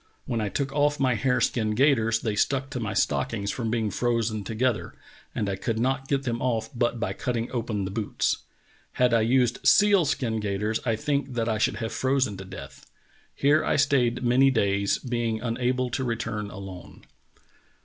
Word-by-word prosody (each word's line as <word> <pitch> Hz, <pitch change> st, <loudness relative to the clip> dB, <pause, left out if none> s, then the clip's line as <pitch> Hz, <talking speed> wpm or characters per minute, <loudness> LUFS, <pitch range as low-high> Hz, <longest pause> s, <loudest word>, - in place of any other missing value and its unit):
When 115 Hz, -2 st, -2 dB
I 105 Hz, -, -1 dB
took 135 Hz, +5 st, -2 dB
off 145 Hz, 0 st, +2 dB
my 130 Hz, -2 st, +3 dB
hare 125 Hz, +2 st, +1 dB
skin 110 Hz, -3 st, 0 dB
gaiters 115 Hz, -4 st, +3 dB
they 110 Hz, -3 st, -1 dB
stuck 135 Hz, +5 st, 0 dB
to 125 Hz, -, -3 dB
my 105 Hz, -3 st, -3 dB
stockings 105 Hz, -4 st, 0 dB
from 115 Hz, -3 st, -3 dB
being 110 Hz, -2 st, 0 dB
frozen 115 Hz, -3 st, 0 dB
together, 115 Hz, +2 st, -1 dB, 0.4 s
and 105 Hz, -, -1 dB
I 100 Hz, -, -1 dB
could 110 Hz, +4 st, -2 dB
not 135 Hz, +3 st, 0 dB
get 135 Hz, -1 st, 0 dB
them 120 Hz, -2 st, -2 dB
off 115 Hz, -3 st, -1 dB
but 120 Hz, -1 st, 0 dB
by 110 Hz, -, -2 dB
cutting 120 Hz, -1 st, -3 dB
open 115 Hz, -5 st, -2 dB
the 95 Hz, -, -4 dB
boots. 105 Hz, 0 st, -1 dB, 0.6 s
Had 125 Hz, -1 st, +2 dB
I 115 Hz, -, +4 dB
used 120 Hz, +1 st, +2 dB
seal 200 Hz, -4 st, +5 dB
skin 120 Hz, -5 st, -1 dB
gaiters 105 Hz, +1 st, -1 dB
I 115 Hz, -, +2 dB
think 140 Hz, 0 st, -2 dB
that 115 Hz, -1 st, 0 dB
I 110 Hz, -2 st, 0 dB
should -, -, +1 dB
have 115 Hz, -1 st, -4 dB
frozen 130 Hz, -5 st, +1 dB
to 95 Hz, -, -8 dB
death. 95 Hz, -, -11 dB, 0.5 s
Here 145 Hz, +3 st, +3 dB
I -, -, +1 dB
stayed 130 Hz, -4 st, +2 dB
many 125 Hz, +3 st, +5 dB
days, 100 Hz, -5 st, +1 dB
being 120 Hz, -3 st, -2 dB
unable 125 Hz, +2 st, -1 dB
to 130 Hz, +2 st, -1 dB
return 115 Hz, -3 st, -3 dB
alone." 95 Hz, -2 st, -10 dB
120 Hz, 185 wpm, -26 LUFS, 110-130 Hz, 0.6 s, seal